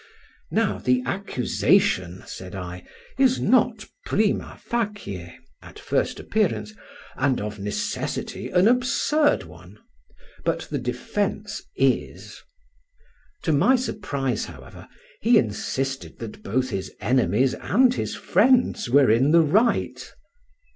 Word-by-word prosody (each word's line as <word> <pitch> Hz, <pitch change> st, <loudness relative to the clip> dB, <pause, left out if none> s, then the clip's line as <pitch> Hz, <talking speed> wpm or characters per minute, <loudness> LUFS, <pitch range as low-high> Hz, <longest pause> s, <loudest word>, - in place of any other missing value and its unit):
Now -, -, 0 dB
the 125 Hz, 0 st, +1 dB
accusation, 120 Hz, -, +1 dB
said 95 Hz, +1 st, -8 dB
I, 90 Hz, -1 st, -7 dB, 0.3 s
is 260 Hz, -2 st, +4 dB
not 230 Hz, -1 st, +2 dB, 0.2 s
prima 210 Hz, 0 st, 0 dB
facie 205 Hz, -, -4 dB, 0.3 s
and -, -, -13 dB, 1.6 s
of 105 Hz, 0 st, -5 dB
necessity 105 Hz, +1 st, -3 dB
an 180 Hz, +3 st, +4 dB
absurd 255 Hz, +5 st, +2 dB
one; -, -, -14 dB, 0.7 s
but -, -, 0 dB
the -, -, -1 dB
defence -, -, -3 dB
is. -, -, -1 dB, 1.0 s
To 160 Hz, -, +1 dB
my 200 Hz, -, +4 dB
surprise, 140 Hz, -, -2 dB
however, 65 Hz, -7 st, -12 dB, 0.3 s
he 230 Hz, +2 st, +5 dB
insisted 135 Hz, -, -2 dB
that 110 Hz, -2 st, -8 dB
both 130 Hz, +5 st, -1 dB
his 95 Hz, -2 st, -4 dB
enemies 125 Hz, 0 st, +2 dB
and 250 Hz, +4 st, +3 dB
his -, -, -3 dB
friends 245 Hz, -, +2 dB
were 135 Hz, -2 st, +5 dB
in 125 Hz, +6 st, +3 dB
the 165 Hz, +1 st, +7 dB
right. 215 Hz, +10 st, +1 dB
135 Hz, 105 wpm, -24 LUFS, -, 1.6 s, the